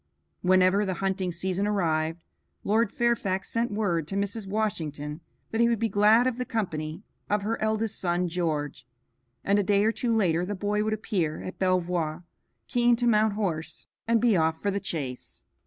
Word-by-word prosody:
Whenever 185 +2 +4
the 190 -2 -2
hunting 190 0 -1
season 185 +3 -1
arrived, 165 -4 0 0.4
Lord 215 +1 +2
Fairfax 205 -6 0
sent 235 +1 0
word 185 -7 -1
to 195 - -4
Mrs. 200 +1 -2
Washington 160 -8 -3 0.3
that 225 - +1
he 235 - +5
would 235 - +2
be 225 +1 0
glad 215 +4 +5
of 255 -1 -1
the - - 0
company 165 -7 -3 0.3
of 205 0 +1
her 225 +2 -2
eldest 220 0 -1
son 175 0 0
George, 150 -6 -2 0.6
and 200 +1 +3
a - - +2
day 200 +1 +3
or 220 - +4
two 235 +1 -2
later 180 -7 +2
the 205 +3 -3
boy 205 +2 0
would 215 0 0
appear 185 -8 -2
at 185 - -7
Belvoir, 180 -3 0 0.4
keen 240 -1 +3
to 240 +1 -2
mount 215 -2 +3
horse 165 -6 -3 0.2
and 230 0 +3
be 230 -2 +3
off 160 -1 +1
for 200 - -1
the 200 - -1
chase. 140 -10 -5
195 Hz, 180 wpm, -27 LUFS, 170-215 Hz, 0.6 s, he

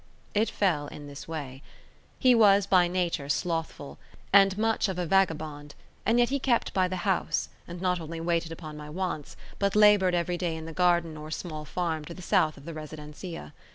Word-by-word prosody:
It 215 +1 +2
fell 170 -10 0
in 145 0 -9
this 140 0 -9
way. 140 -5 -6 0.6
He 255 -1 +5
was 205 -4 +5
by 185 -3 +4
nature 175 -5 -1
slothful, 165 -2 -2 0.3
and 195 -1 +6
much 225 -1 +1
of 185 - -3
a 180 - -1
vagabond, 155 -5 0 0.3
and 230 - +4
yet 240 0 +4
he 280 +1 0
kept 250 -3 +1
by 185 -1 +2
the 185 - -3
house, 190 -3 0 0.2
and 175 0 -7
not 180 -1 0
only 165 +1 -6
waited 165 0 -1
upon 155 -2 -8
my 150 0 -9
wants, 170 -3 -4 0.2
but 200 0 +1
laboured 205 -4 +6
every 175 0 -1
day 170 -3 -1
in 160 0 -7
the 165 - -7
garden 170 -2 +2
or 150 0 -8
small 155 -1 -5
farm 160 -1 -2
to 170 - -8
the 185 - -10
south 155 -3 +2
of 140 - -14
the 165 - -6
residencia. 155 - -8
170 Hz, 195 wpm, -28 LUFS, 155-190 Hz, 0.6 s, and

